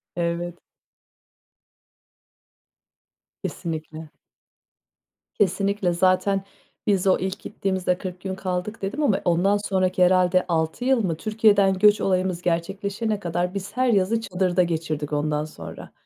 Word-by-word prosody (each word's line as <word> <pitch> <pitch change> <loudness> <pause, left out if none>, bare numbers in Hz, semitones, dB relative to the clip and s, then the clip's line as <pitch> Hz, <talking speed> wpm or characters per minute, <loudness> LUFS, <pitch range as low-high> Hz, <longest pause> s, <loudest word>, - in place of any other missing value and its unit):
Evet. 170 0 -2 2.9
Kesinlikle. 160 -2 -5 1.3
Kesinlikle. 195 -1 +1
Zaten 185 +2 +2 0.4
biz 195 -2 +2
o 190 - +5
ilk 190 +1 -3
gittiğimizde 190 -3 -1
40 180 -1 -7
gün 190 -1 -4
kaldık 185 +3 -4
dedim 205 +10 -2
ama 215 -9 +2
ondan 180 +4 +3
sonraki 185 -1 +2
herhâlde 185 0 +4
6 160 +7 -1
yıl 260 -3 +3
mı? 165 -5 -1
Türkiye'den 210 -1 +3
göç 210 0 +5
olayımız 185 -2 0
gerçekleşene 200 +5 -1
kadar 175 0 -2
biz 200 +3 -6
her 255 0 +3
yazı 220 0 +2
çadırda 185 -3 +1
geçirdik 155 -3 -3
ondan 150 0 0
sonra. 155 - -10
185 Hz, 115 wpm, -24 LUFS, 175-200 Hz, 2.9 s, o